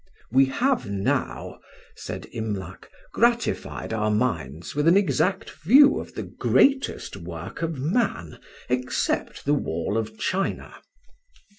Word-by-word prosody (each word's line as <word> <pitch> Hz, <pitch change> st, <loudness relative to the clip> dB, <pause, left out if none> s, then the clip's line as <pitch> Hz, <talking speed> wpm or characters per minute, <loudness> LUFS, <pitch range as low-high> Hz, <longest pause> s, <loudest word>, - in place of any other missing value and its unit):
"We 135 Hz, +2 st, +6 dB
have 245 Hz, -, 0 dB
now," 100 Hz, -1 st, -2 dB, 0.4 s
said -, -, -7 dB
Imlac, 105 Hz, -4 st, -5 dB, 0.2 s
"gratified 235 Hz, -, 0 dB
our 110 Hz, -1 st, 0 dB
minds 85 Hz, -, -1 dB
with 150 Hz, +2 st, +1 dB
an 175 Hz, +3 st, +6 dB
exact 195 Hz, -1 st, +1 dB
view 255 Hz, -, +5 dB
of -, -, -9 dB
the -, -, -3 dB
greatest 275 Hz, 0 st, +1 dB
work 85 Hz, -, -8 dB
of 165 Hz, -2 st, -2 dB
man, 150 Hz, -, -1 dB, 0.3 s
except 125 Hz, 0 st, -1 dB
the 145 Hz, -, +3 dB
wall 100 Hz, -, -1 dB
of 110 Hz, 0 st, -5 dB
China. 195 Hz, +1 st, -2 dB
130 Hz, 120 wpm, -25 LUFS, -, 0.4 s, We